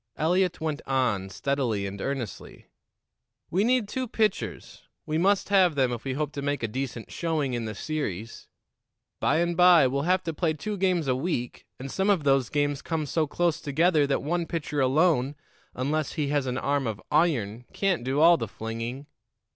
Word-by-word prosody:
Eliot 180 Hz, +2 st, +1 dB
went 155 Hz, -2 st, -3 dB
on, 120 Hz, -8 st, 0 dB
steadily 120 Hz, -1 st, -1 dB
and 100 Hz, 0 st, -6 dB
earnestly: 135 Hz, -6 st, -5 dB, 0.9 s
"We 190 Hz, +4 st, +2 dB
need 245 Hz, -2 st, +2 dB
two 260 Hz, +4 st, -3 dB
pitchers 215 Hz, -3 st, -2 dB, 0.2 s
we 155 Hz, +1 st, -1 dB
must 195 Hz, +3 st, +2 dB
have 185 Hz, -5 st, +4 dB
them 130 Hz, -3 st, +2 dB
if 120 Hz, -1 st, -4 dB
we 135 Hz, -, -2 dB
hope 150 Hz, +1 st, -2 dB
to 140 Hz, -, -5 dB
make 145 Hz, -2 st, -2 dB
a -, -, +1 dB
decent 120 Hz, 0 st, -5 dB
showing 155 Hz, -6 st, -1 dB
in 120 Hz, -2 st, -2 dB
the 110 Hz, -1 st, -5 dB
series. 115 Hz, -, -4 dB, 0.7 s
By -, -, +2 dB
and 170 Hz, +1 st, +1 dB
by 175 Hz, -4 st, +7 dB
we'll 135 Hz, +2 st, 0 dB
have 180 Hz, +4 st, +1 dB
to 165 Hz, -, -3 dB
play 160 Hz, 0 st, 0 dB
two 210 Hz, +7 st, -4 dB
games 180 Hz, -5 st, +1 dB
a 130 Hz, -, +2 dB
week, 130 Hz, -4 st, -3 dB
and 135 Hz, +1 st, -6 dB
some 190 Hz, +1 st, 0 dB
of 190 Hz, -7 st, +3 dB
those 135 Hz, -3 st, +2 dB
games 145 Hz, -1 st, 0 dB
come 160 Hz, -2 st, -2 dB
so 155 Hz, +2 st, 0 dB
close 170 Hz, +2 st, 0 dB
together 155 Hz, +1 st, +2 dB
that 140 Hz, -, 0 dB
one 170 Hz, +3 st, -1 dB
pitcher 150 Hz, -3 st, -3 dB
alone, 140 Hz, 0 st, +2 dB, 0.4 s
unless 145 Hz, +4 st, -1 dB
he 150 Hz, -4 st, -1 dB
has 145 Hz, -2 st, 0 dB
an 125 Hz, 0 st, -2 dB
arm 140 Hz, -2 st, 0 dB
of 110 Hz, -3 st, -3 dB
iron, 125 Hz, -8 st, +1 dB
can't 190 Hz, -9 st, 0 dB
do 135 Hz, +4 st, 0 dB
all 170 Hz, +1 st, +7 dB
the 115 Hz, -, -3 dB
flinging. 115 Hz, +6 st, -5 dB
145 Hz, 185 wpm, -26 LUFS, 130-170 Hz, 0.9 s, by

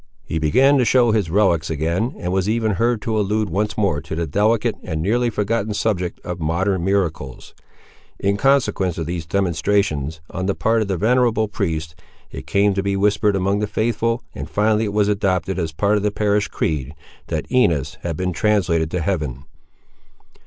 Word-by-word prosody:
He 80 Hz, -, -2 dB
began 135 Hz, -, +4 dB
to -, -, +4 dB
show 120 Hz, -1 st, +4 dB
his 105 Hz, -6 st, 0 dB
relics 85 Hz, -4 st, +2 dB
again, 85 Hz, -, -1 dB
and 90 Hz, +1 st, -3 dB
was 95 Hz, +1 st, 0 dB
even 110 Hz, -1 st, +1 dB
heard 115 Hz, +3 st, 0 dB
to 110 Hz, -1 st, 0 dB
allude 105 Hz, -1 st, 0 dB
once 105 Hz, +4 st, -1 dB
more 95 Hz, -9 st, +1 dB
to 80 Hz, 0 st, -6 dB
the 85 Hz, +1 st, -1 dB
delicate 105 Hz, +8 st, +1 dB
and 80 Hz, -3 st, -4 dB
nearly 120 Hz, +8 st, +1 dB
forgotten 105 Hz, 0 st, -1 dB
subject 95 Hz, -5 st, -1 dB
of 90 Hz, 0 st, -6 dB
modern 85 Hz, +3 st, 0 dB
miracles. 85 Hz, -9 st, -2 dB, 0.6 s
In 100 Hz, +1 st, 0 dB
consequence 120 Hz, -8 st, +1 dB
of 80 Hz, -, -3 dB
these 85 Hz, -1 st, -4 dB
demonstrations, 85 Hz, -4 st, 0 dB
on 95 Hz, 0 st, -3 dB
the 100 Hz, -, 0 dB
part 115 Hz, 0 st, +1 dB
of 105 Hz, -, -1 dB
the 95 Hz, -2 st, -1 dB
venerable 115 Hz, +1 st, +2 dB
priest, 80 Hz, -7 st, -3 dB, 0.4 s
it -, -, -8 dB
came 100 Hz, 0 st, +2 dB
to 95 Hz, -, 0 dB
be 100 Hz, 0 st, -1 dB
whispered 105 Hz, 0 st, +2 dB
among 100 Hz, +2 st, +1 dB
the 105 Hz, -, -1 dB
faithful, 115 Hz, +2 st, -1 dB
and -, -, -7 dB
finally 110 Hz, +1 st, +2 dB
it 100 Hz, -, -3 dB
was 105 Hz, -1 st, +2 dB
adopted, 95 Hz, -3 st, 0 dB
as 80 Hz, -2 st, -2 dB
part 100 Hz, +6 st, +1 dB
of -, -, -1 dB
the 105 Hz, -, +1 dB
parish 105 Hz, 0 st, 0 dB
creed, 75 Hz, -2 st, -2 dB, 0.3 s
that -, -, -2 dB
Inez 80 Hz, -, +1 dB
had 85 Hz, -3 st, -3 dB
been 90 Hz, 0 st, -1 dB
translated 90 Hz, -5 st, +1 dB
to 90 Hz, +1 st, -2 dB
heaven. 75 Hz, -8 st, -2 dB
100 Hz, 185 wpm, -20 LUFS, 85-105 Hz, 0.6 s, began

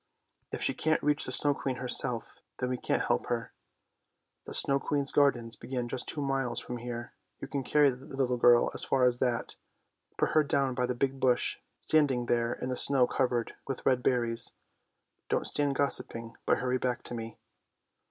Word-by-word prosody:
If -, -, -3 dB
she -, -, +1 dB
can't 160 Hz, 0 st, 0 dB
reach 150 Hz, 0 st, +1 dB
the -, -, -3 dB
Snow 145 Hz, -1 st, +3 dB
Queen 135 Hz, -1 st, -3 dB
herself, 125 Hz, -1 st, -1 dB, 0.2 s
then 125 Hz, -, -2 dB
we 125 Hz, -, -1 dB
can't -, -, 0 dB
help -, -, 0 dB
her. 115 Hz, -2 st, -3 dB, 0.9 s
The -, -, -6 dB
Snow 140 Hz, 0 st, +4 dB
Queen's 140 Hz, 0 st, 0 dB
gardens 120 Hz, -5 st, +2 dB
begin 125 Hz, -2 st, -4 dB
just 125 Hz, +1 st, -4 dB
two 150 Hz, -, -3 dB
miles 135 Hz, -3 st, 0 dB
from 125 Hz, -, -6 dB
here; 120 Hz, 0 st, -6 dB, 0.3 s
you -, -, -6 dB
can 140 Hz, 0 st, -3 dB
carry 145 Hz, +1 st, +4 dB
the 130 Hz, +3 st, -11 dB
little 130 Hz, -3 st, -1 dB
girl 120 Hz, 0 st, +5 dB
as -, -, -4 dB
far 135 Hz, -1 st, +1 dB
as 125 Hz, -1 st, +2 dB
that. 120 Hz, -2 st, -1 dB, 0.6 s
Put -, -, +1 dB
her 155 Hz, -, +4 dB
down 135 Hz, -2 st, 0 dB
by 125 Hz, 0 st, 0 dB
the 125 Hz, -, -2 dB
big 135 Hz, +1 st, -1 dB
bush 125 Hz, -2 st, +1 dB, 0.2 s
standing 140 Hz, -6 st, +2 dB
there 120 Hz, 0 st, +1 dB
in 130 Hz, -, -5 dB
the 130 Hz, -, -1 dB
snow 135 Hz, -3 st, +4 dB
covered 125 Hz, -2 st, -1 dB
with 135 Hz, -, -5 dB
red 130 Hz, -2 st, +3 dB
berries. 120 Hz, -2 st, +1 dB, 0.8 s
Don't -, -, 0 dB
stand 145 Hz, -2 st, +2 dB
gossiping, 115 Hz, -5 st, -2 dB
but -, -, +4 dB
hurry 125 Hz, 0 st, -1 dB
back 125 Hz, -1 st, -2 dB
to -, -, -6 dB
me! 115 Hz, -2 st, -6 dB
125 Hz, 190 wpm, -30 LUFS, 120-135 Hz, 0.9 s, girl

